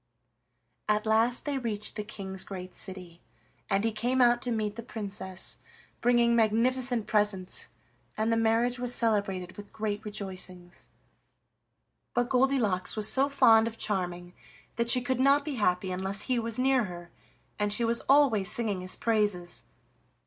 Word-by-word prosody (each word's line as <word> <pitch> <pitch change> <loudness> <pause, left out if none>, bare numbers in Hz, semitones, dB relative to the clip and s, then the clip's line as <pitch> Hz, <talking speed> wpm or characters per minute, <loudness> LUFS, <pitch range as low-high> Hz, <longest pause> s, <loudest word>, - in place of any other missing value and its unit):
At 210 0 +1
last 225 +3 +2
they 285 -2 -1
reached 215 -4 -4
the 210 - -3
King's 190 -3 -5
great 185 -2 -8
city, 180 -3 -8 0.5
and 200 0 +1
he 225 - +1
came 245 +4 -1
out 240 -1 +4
to 245 - -3
meet 215 -2 -2
the 230 - -6
Princess, 200 -5 -5 0.4
bringing 240 -1 +3
magnificent 235 +1 +2
presents, 205 -3 -1 0.5
and 220 +1 +1
the - - +2
marriage 225 +2 +1
was 245 0 -4
celebrated 200 -5 -1
with 205 -1 -11
great 210 -1 -3
rejoicings. 185 -3 -4 1.3
But 245 0 +1
Goldilocks 250 -8 +1
was 215 -1 +5
so 275 +2 +3
fond 225 -5 +5
of 225 0 -6
Charming 180 -3 -3 0.4
that 235 0 0
she 250 +1 +4
could 255 0 -1
not 280 +2 +4
be 300 - -3
happy 180 -1 +1
unless 190 +2 -2
he 255 -2 0
was 230 -1 -2
near 260 -2 +2
her, 175 -2 -9 0.5
and 205 0 +1
she 225 +3 +2
was 235 0 +1
always 240 -9 +4
singing 215 -5 -1
his 185 0 -1
praises. 205 -6 -1
220 Hz, 155 wpm, -28 LUFS, 195-240 Hz, 1.3 s, was